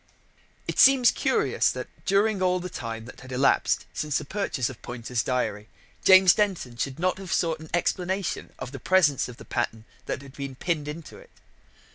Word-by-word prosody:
It - - -3
seems 260 -2 +7
curious - - +1
that, - - -4 0.2
during 200 0 +2
all 185 0 +2
the 180 0 -6
time 115 -1 -6
that 120 - -12
had 130 0 -11
elapsed 135 +2 +2
since 150 -2 -1
the - - -4
purchase 150 - -2
of 130 -4 -9
Poynter's 120 0 -3
diary, 110 -4 -2 0.3
James 190 -2 +8
Denton 190 - -1
should 130 +3 -3
not 185 +2 0
have 190 -3 -7
sought 165 -2 +1
an 160 0 -11
explanation 180 +2 -1
of 125 - -7
the 135 - -7
presence 155 -6 +3
of 120 - -10
the - - -12
pattern 115 -2 -3 0.2
that 135 - -3
had 135 -1 -13
been 140 -2 -6
pinned 155 +1 -2
into 155 +1 -8
it. - - -17
150 Hz, 185 wpm, -26 LUFS, 125-185 Hz, 0.3 s, James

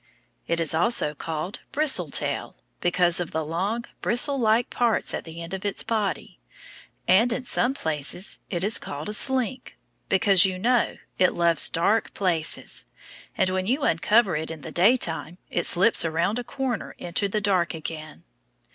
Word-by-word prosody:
It 170 0 -1
is 165 -2 0
also 165 -2 +2
called 160 +5 -5
bristle 300 -1 +3
tail, - - 0 0.2
because 175 -1 +1
of 175 - -3
the 160 -1 -3
long, 195 +9 -3 0.2
bristle 275 +4 +2
like 225 0 +1
parts 235 -3 +1
at - - -4
the 165 +1 -8
end 165 +3 -8
of 190 - -5
its 205 -1 -1
body; 215 -4 -3 0.7
and 215 +7 +4
in 250 +2 -3
some 245 +2 +1
places 160 - -2
it 175 -2 -2
is 205 +2 0
called 145 +6 -7
a - - -3
slink, 260 +2 0 0.3
because, 195 -1 +5
you 190 -1 0
know, 240 +5 +1 0.2
it 185 - +3
loves 170 -1 +5
dark 200 +7 0
places, 170 -5 -1 0.5
and 185 - +1
when 185 0 -2
you 270 +5 0
uncover 200 - +2
it 155 +1 -3
in 160 -2 -8
the - - -8
daytime, 175 -4 +1
it 175 - -1
slips 195 +6 +4
around 170 +7 -1
a - - -5
corner 255 -2 -4
into 175 +4 -2
the 215 - -1
dark 185 -4 0
again. 155 -1 -8
185 Hz, 165 wpm, -24 LUFS, 165-230 Hz, 0.7 s, because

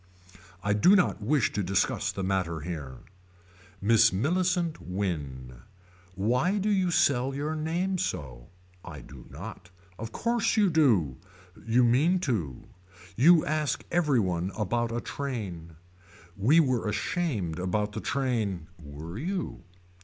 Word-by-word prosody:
I 100 - +2
do 140 - +5
not 180 - +2
wish 130 +3 +1
to 105 - -1
discuss 95 0 0
the 95 - -5
matter 90 -4 -1
here. 75 -6 -6 0.8
Miss 115 +2 +5
Millicent 175 - 0
Wynne. 70 -10 -4 0.5
Why 125 - +1
do 210 +1 0
you 190 -3 +2
sell 135 -5 +2
your 150 +3 -2
name 175 +5 -1
so. 65 - -4 0.4
I 75 -6 -9
do - - -13
not. 90 +4 -9 0.3
Of 115 +1 -6
course 235 - 0
you 205 -4 +4
do. 110 - +3 0.5
You 120 +2 +4
mean 140 +10 +3
to. 95 - -2 0.5
You 160 - +6
ask 150 -3 -1
every 150 -7 +2
one 90 -2 -1
about 115 +3 -1
a 120 +1 -2
train. 100 - -5 0.6
We 125 +12 +4
were 130 -8 +1
ashamed 105 - -2
about 105 +3 -1
the 110 +1 -5
train. 115 - -1 0.2
Were 75 +7 -8
you. 170 - -3
115 Hz, 130 wpm, -28 LUFS, -, 0.8 s, You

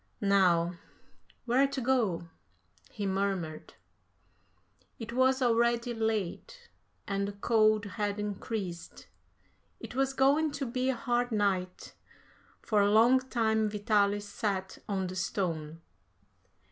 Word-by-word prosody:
Now, 180 -3 +3 0.7
where 255 +3 +3
to 275 0 -4
go?" 235 -10 0 0.6
he 205 -3 -5
murmured. 190 -5 -2 1.2
It 235 0 -7
was 260 +1 +3
already 235 0 +2
late 225 - -3 0.4
and 200 0 -1
the 200 - -5
cold 215 0 +2
had 205 0 -3
increased. 205 -3 -5 0.7
It - - -9
was 270 +1 0
going 285 +3 +3
to 275 - -3
be 255 +2 -1
a 265 - +1
hard 245 0 -1
night. 190 -4 -1 0.7
For 210 -2 +2
a 200 - +3
long 230 +5 +5
time 220 -4 0
Vitalis 205 -1 +1
sat 195 -2 -3
on 190 -2 -1
the 185 0 -5
stone. 165 -4 -3
215 Hz, 115 wpm, -30 LUFS, 195-245 Hz, 1.2 s, long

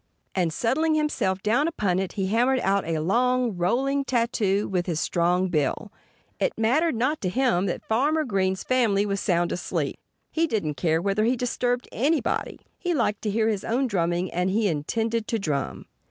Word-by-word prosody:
And 175 -4 +1
settling 310 - +1
himself 195 -11 0
down 240 +9 +2
upon 200 - 0
it 190 -1 -3
he 195 -2 -1
hammered 245 +6 +2
out 195 0 +1
a 165 -1 0
long, 240 +6 +1
rolling 265 +11 +1
tattoo 230 -6 0
with 180 -2 -1
his 165 -3 -1
strong 180 +3 +1
bill. 155 +6 -1 0.5
It - - 0
mattered 265 +7 +2
not 255 +7 0
to 185 - 0
him 215 -4 +1
that 175 - -4
Farmer 290 +8 +1
Green's 190 -6 0
family 225 -6 +2
was 200 -1 -1
sound 175 -2 +1
asleep. 180 - -3 0.3
He 330 +1 +1
didn't 200 - -1
care 160 +4 0
whether 200 +2 +1
he 245 +3 +2
disturbed 245 0 -1
anybody. 295 +6 -1 0.2
He 355 -2 -1
liked 215 -6 0
to 215 - -2
hear 220 +2 +1
his 210 -3 -1
own 250 +4 0
drumming; 175 -4 0
and 180 +2 0
he 210 +2 +1
intended 220 +8 -1
to 230 - 0
drum. 150 -9 -3
215 Hz, 180 wpm, -25 LUFS, 185-250 Hz, 0.5 s, down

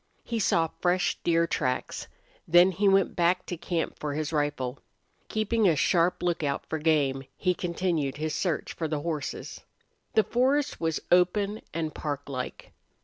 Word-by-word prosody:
He 230 -1 -2
saw 165 -5 +2
fresh 180 0 +1
deer 170 0 +3
tracks. 130 -5 -2 0.4
Then 175 +3 +6
he 200 +2 +2
went 195 -1 +3
back 175 +1 +2
to 175 - -4
camp 170 0 -3
for 145 -1 -3
his 155 +1 -2
rifle. 145 -4 -1 0.5
Keeping 215 0 +1
a 165 - +3
sharp 175 +4 +2
lookout 160 -5 -1
for 160 - -3
game, 145 -4 +2
he 180 -1 +2
continued 170 -6 -1
his 155 0 -2
search 175 -5 -1
for 160 - -3
the 150 -1 -2
horses. 155 -3 -4 0.5
The 220 - +6
forest 270 +4 +1
was 160 -1 0
open 200 +4 +3
and 160 -2 -3
parklike. 140 -3 -5
170 Hz, 150 wpm, -28 LUFS, 150-185 Hz, 0.5 s, Then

